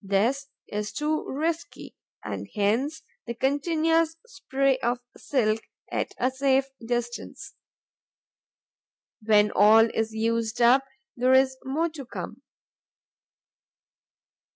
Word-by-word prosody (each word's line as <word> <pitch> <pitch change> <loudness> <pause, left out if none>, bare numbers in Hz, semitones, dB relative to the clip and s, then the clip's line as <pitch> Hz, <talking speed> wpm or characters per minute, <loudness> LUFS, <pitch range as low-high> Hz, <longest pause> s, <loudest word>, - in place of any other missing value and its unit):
This 225 +8 +1 0.2
is 210 0 -4
too 305 +1 -1
risky; 320 +4 -4 0.3
and - - -5
hence 250 +10 0 0.2
the 235 - -4
continuous 320 +5 +1
spray 275 - 0
of 240 0 0 0.2
silk, 220 -5 0 0.3
at - - -2
a 255 +2 +1
safe 270 0 +2 0.2
distance. 240 0 -4 1.7
When 210 -1 +4
all 220 +3 +6
is 225 0 -1
used 225 +1 -1
up, 250 +3 +5 0.3
there 255 +1 +3
is 260 0 +4
more 310 +6 -1
to 305 -3 -9
come. 245 - -8
260 Hz, 105 wpm, -26 LUFS, 225-285 Hz, 1.7 s, all